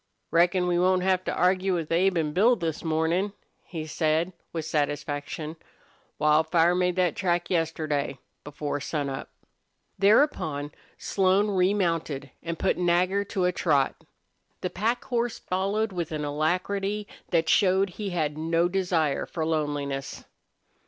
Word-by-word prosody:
"Reckon 175 +2 +3
we 175 -1 +1
won't 185 0 +3
have 185 -1 +2
to - - -1
argue 185 +1 +2
with 165 -2 -3
Abe 180 +2 +3
an' 155 -2 0
Bill 225 +8 +5
this 165 -7 -3
mornin'," 165 +5 0 0.3
he 160 -3 -6
said, 160 +3 0 0.2
with 165 -2 -4
satisfaction. 150 +1 -2 0.6
"Wildfire 160 +3 +3
made 180 0 +1
that 180 -4 +1
track 175 -2 0
yesterday, 155 -5 -1 0.3
before 145 0 -4
sunup." 140 -2 -3 0.7
Thereupon 180 - +2 0.3
Slone 195 +2 +2
remounted 175 -7 0
and 170 0 -4
put 190 - 0
Nagger 180 +3 +2
to 185 -2 -1
a 180 - +3
trot. 145 -6 +2 0.7
The 180 - -2
pack 230 +4 -1
horse 240 -1 -1
followed 200 +4 -1
with 175 -3 -4
an 150 -1 -2
alacrity 195 +7 -1 0.2
that 165 -2 +2
showed 190 +1 +3
he 205 +2 -5
had 155 -4 -2
no 165 +2 +2
desire 175 -6 0
for 160 -2 -3
loneliness. 145 -3 -2
170 Hz, 135 wpm, -26 LUFS, 155-185 Hz, 0.7 s, Bill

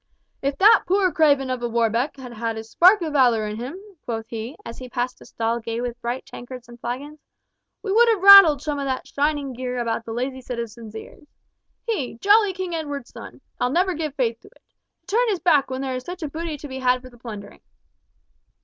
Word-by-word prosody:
"If 275 0 -2
that 415 +4 +6
poor 380 0 +2
craven 285 -5 +3
of 255 -1 -3
a 240 - -2
Warbeck 235 +4 0
had 250 -3 -9
had 225 0 -3
a 220 - -5
spark 360 - +4
of 310 -2 -3
valour 240 -6 +3
in 210 0 -5
him," 255 +10 -6 0.2
quoth 225 -2 -4
he, 230 +4 -6
as 230 - -8
he 255 -1 -9
passed 245 0 -3
a - - -13
stall 230 +1 -2
gay 230 0 -4
with 245 0 -5
bright 240 +2 -4
tankards 245 0 -10
and 240 0 -14
flagons, 285 +6 -6 0.6
"we 400 - -2
would 465 +3 +5
have 425 -5 +1
rattled 390 -8 +9
some 295 -2 -2
of 280 - -3
that 260 -1 -2
shining 285 -2 -1
gear 250 0 -4
about 230 -1 -2
the 230 - -8
lazy 260 +3 -3
citizens' 235 -3 -7
ears! 295 +6 -11 0.6
He, 400 - -2
jolly 410 - +4
King 370 -2 -5
Edward's 290 -5 -5
son! - - -11 0.2
I'll 245 - +1
never 360 +6 +1
give 305 -3 -4
faith 230 -4 -1
to - - -18
it! - - -23 0.4
To 410 - -4
turn - - +3
his 390 -4 0
back 300 -6 +3
when 260 0 -4
there 265 -1 -3
was 255 0 -4
such 355 +3 -7
a - - -2
booty 320 0 -5
to 295 - -9
be 265 -1 -7
had 255 0 +1
for 255 - -12
the 240 - -19
plundering." 210 -4 -9
260 Hz, 220 wpm, -23 LUFS, 235-315 Hz, 0.6 s, rattled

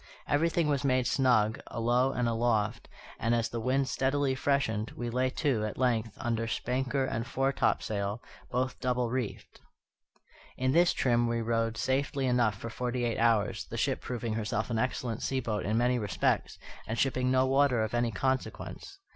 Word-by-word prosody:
Everything 160 +2 +2
was 145 -1 0
made 130 -2 +2
snug, 120 -5 +2
alow 120 +3 +1
and 125 -2 0
aloft; 115 -1 0 0.3
and, 115 +1 +2
as 115 -1 0
the 115 - -4
wind 130 +3 +1
steadily 135 +1 +1
freshened, 130 -6 0
we 120 -1 -3
lay 130 +2 +1
to, 130 -5 0
at 105 - -4
length, 115 -4 0
under 115 -2 -1
spanker 130 +4 -1
and 115 -2 -3
foretopsail, 110 -6 0 0.3
both 130 +1 -1
double 125 -2 0
reefed. 125 -4 -4 1.0
In 130 0 +1
this 170 +4 +5
trim 120 -2 +2
we 115 0 0
rode 115 0 0
safely 135 +3 0
enough 120 -4 +2
for 115 +4 -6
forty 125 +1 -2
eight 115 - -1
hours, 115 -3 +2
the - - -7
ship - - 0
proving 120 -2 -3
herself 110 +1 -2
an 115 - 0
excellent 120 -2 -2
sea 135 - 0
boat 110 -5 -2
in 110 +2 +1
many 125 +1 +2
respects, 100 -5 0 0.3
and 110 - -3
shipping 130 -1 +1
no 130 0 +3
water 135 -3 +3
of 110 - -3
any 120 0 +1
consequence. 130 - -3
120 Hz, 170 wpm, -30 LUFS, 115-130 Hz, 1.0 s, this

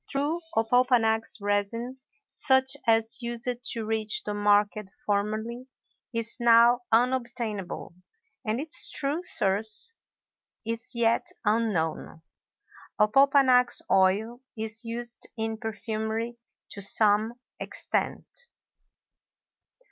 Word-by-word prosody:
True 295 +5 -1 0.2
opopanax 225 -1 +3
resin, 205 +5 -2 0.3
such 265 +1 +2
as 225 +2 +2
used 235 0 -5 0.2
to 230 -5 -2
reach 220 -1 +1
the 210 - -3
market 205 0 +2 0.2
formerly, 215 +4 -2 0.4
is 230 -1 -3
now 235 +1 +6
unobtainable, 235 -6 -1 0.5
and 220 0 -1
its 310 +3 -3
true 290 +4 -2
source 215 - 0 0.7
is 230 +1 -4
yet 230 0 +2 0.2
unknown. 200 -7 -1 0.8
Opopanax 255 +2 +4
oil 210 +6 +2 0.2
is 220 +1 -5
used 235 +1 -5
in 220 0 -2
perfumery 220 +1 -3 0.4
to 200 - -8
some 215 +3 +2 0.2
extent. - - -2
225 Hz, 90 wpm, -27 LUFS, 215-245 Hz, 0.8 s, now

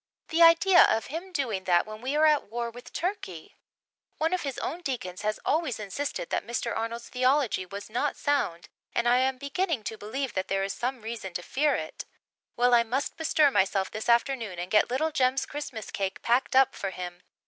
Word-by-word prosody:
The 330 0 +1
idea 345 +3 +7
of 220 0 +2
him 360 +4 -5
doing 235 - -2
that 175 -1 +3
when 215 0 -9
we 265 +4 -2
are 310 +1 +4
at 305 -1 +4
war 235 +1 -3
with 245 +1 -12
Turkey? 330 - -4 0.6
One 320 +3 0
of 365 - 0
his 275 -3 -4
own 345 - -4
deacons 200 - -4
has 215 0 -1
always 305 -6 0
insisted 285 - -4
that - - 0
Mr. 235 -1 -3
Arnold's 230 +1 -4
theology 255 -6 +1
was 200 +2 -7
not 245 +6 -1
sound 275 -13 -1 0.3
and 235 - +1
I 245 +1 +5
am 260 0 +1
beginning 280 - -2
to 220 +1 -5
believe 260 +6 -4
that 185 0 -2
there 195 0 0
is 195 - -2
some 250 -1 -3
reason 220 -5 -6
to 175 - -3
fear 295 +7 +1
it. - - -5 0.5
Well, 245 +1 +3
I 235 - +7
must 250 +5 -2
bestir 310 -2 +3
myself 190 -2 +1
this 215 +2 -5
afternoon 235 -5 +1
and 175 +1 -5
get 210 - +4
little 300 +6 0
Jem's 260 -1 +1
Christmas 265 -7 -6
cake 195 -1 -3
packed 245 +3 +1
up 265 0 +5
for 195 - -4
him. 180 -1 -7
245 Hz, 205 wpm, -28 LUFS, 210-285 Hz, 0.6 s, idea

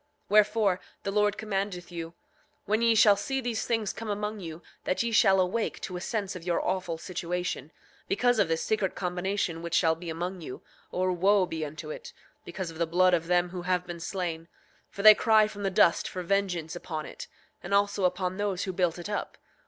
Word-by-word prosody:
8:24 - - -44
Wherefore, 210 -2 +4 0.2
the 195 - -2
Lord 210 0 +2
commandeth 195 -4 -3
you, 165 -1 -6 0.5
when 215 +3 +1
ye 230 -1 +4
shall 210 -1 +7
see 270 +7 -2
these 240 -3 -2
things 225 -3 0
come 225 -1 -6
among 210 +1 -3
you 165 -2 -8 0.2
that 185 - 0
ye 235 - -1
shall 195 -3 +5
awake 185 +5 0
to 185 - -5
a 175 - -4
sense 200 -2 -3
of 180 - -7
your 175 -1 0
awful 180 -3 -1
situation, 175 -2 -4 0.4
because 245 +2 +2
of - - +4
this 165 0 0
secret 210 -4 0
combination 180 -1 -2
which 170 0 -2
shall 160 - +4
be 165 +1 -8
among 175 +3 -4
you; 130 - -8 0.3
or 185 0 0
wo 190 +2 +3
be 160 -2 -4
unto 155 +1 -6
it, - - -8 0.3
because 175 -1 -5
of 160 - -12
the 170 - +1
blood 180 +2 +4
of 165 -1 +1
them 175 0 +2
who 180 0 -6
have 180 0 0
been 175 -1 -7
slain; 165 -2 -4 0.4
for 200 - -6
they 215 0 +11
cry 220 -1 +4
from 205 -1 -9
the 195 - +1
dust 170 -2 +3
for 185 - -5
vengeance 175 -3 -1
upon 155 -3 -5
it, - - -9 0.3
and 175 - -8
also 200 0 +2
upon 180 0 0
those 200 -2 -1
who 190 - -3
built 180 -2 +1
it 175 - -6
up. 205 - -4
185 Hz, 210 wpm, -28 LUFS, 170-205 Hz, 0.5 s, they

